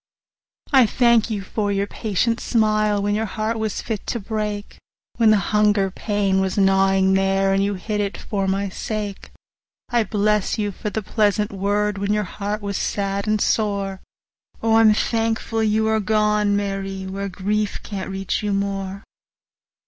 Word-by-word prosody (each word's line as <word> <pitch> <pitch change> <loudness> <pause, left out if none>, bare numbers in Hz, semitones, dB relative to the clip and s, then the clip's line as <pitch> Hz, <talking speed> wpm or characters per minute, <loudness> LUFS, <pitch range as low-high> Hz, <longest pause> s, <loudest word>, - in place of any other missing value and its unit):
40 270 -3 +7
I - - +4
thank 235 0 +3
you 205 -3 -3
for 205 +2 -2
the 200 0 0
patient 225 +3 -1
smile 215 -2 +1
When 205 0 +1
your 220 +1 0
heart 220 +2 -2
was 220 -2 -2
fit 220 -3 -4
to 235 - -2
break, 210 -1 -4 0.4
When 230 -2 +5
the 215 - +6 0.2
hunger 210 -2 +3
pain 200 -1 0
was 190 0 -1
gnawin' 195 -1 +3
there, 195 0 +2
And 195 0 +2
you 200 0 0
hid 210 +3 -2
it, 200 -1 -3
for 195 -2 -2
my 195 +1 0
sake! 205 0 -5 0.6
I 240 -2 +2
bless 210 0 0
you 205 -1 -1
for 210 - -5
the 220 +1 -3
pleasant 210 0 +1
word, 205 +1 0
45 - - -6
When 200 +1 +1
your 210 - 0
heart 205 +3 -4
was 200 -1 -2
sad 200 0 -2
and 215 0 +2
sore— 200 -3 0 0.6
O, 225 0 +4
I'm 220 -1 +6
thankful 225 0 0
you 220 0 +2
are 220 0 +2
gone, 210 0 +2
Mary, 195 -1 -3
Where 195 +1 -4
grief 205 +3 -2
can't 195 -2 -5
reach 195 0 -2
you 205 -1 -1
more! 195 0 -3
205 Hz, 170 wpm, -22 LUFS, 195-215 Hz, 0.6 s, 40